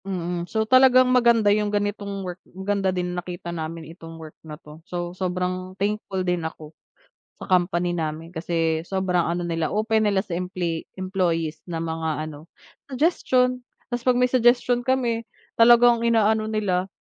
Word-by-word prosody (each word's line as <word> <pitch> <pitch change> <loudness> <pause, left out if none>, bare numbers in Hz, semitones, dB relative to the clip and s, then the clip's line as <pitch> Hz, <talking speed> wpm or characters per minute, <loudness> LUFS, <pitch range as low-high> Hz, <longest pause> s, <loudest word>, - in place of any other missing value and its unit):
Mm, 175 -2 -3
so 220 -1 0
talagang 255 +1 +5
maganda 235 -4 +4
'yong 210 0 0
ganitong 205 -1 -3
work, 180 0 -7
maganda 195 +1 -1
din 180 -1 -2
nakita 175 -1 -6
namin 165 0 -5
itong 165 -1 -11
work 160 -1 -10
na 155 -2 -9
'to, 150 0 -14
so 175 +1 -5
sobrang 185 0 -3
thankful 200 -2 -2
din 180 -1 0
ako 160 -1 -7 0.7
sa - - -8
company 175 -1 +1
namin 165 +1 -4
kasi 165 -1 -1
sobrang 180 -1 0
ano 175 +1 -2
nila 165 -2 -1
open 220 +1 +1
nila 205 -2 +2
sa 190 -3 -4
emple 180 -2 -3 0.2
employees 170 -4 -1
na 165 -1 -3
mga 160 -1 -3
ano 150 -1 -10 0.5
suggestion. 255 -4 +1 0.2
Tas 240 -1 -4
'pag 250 0 +3
may 250 - +4
suggestion 245 0 +3
kami 240 -3 0 0.3
talagang 235 0 +6
inaano 220 -2 +3
nila 190 -3 -1
185 Hz, 155 wpm, -24 LUFS, 170-220 Hz, 0.7 s, talagang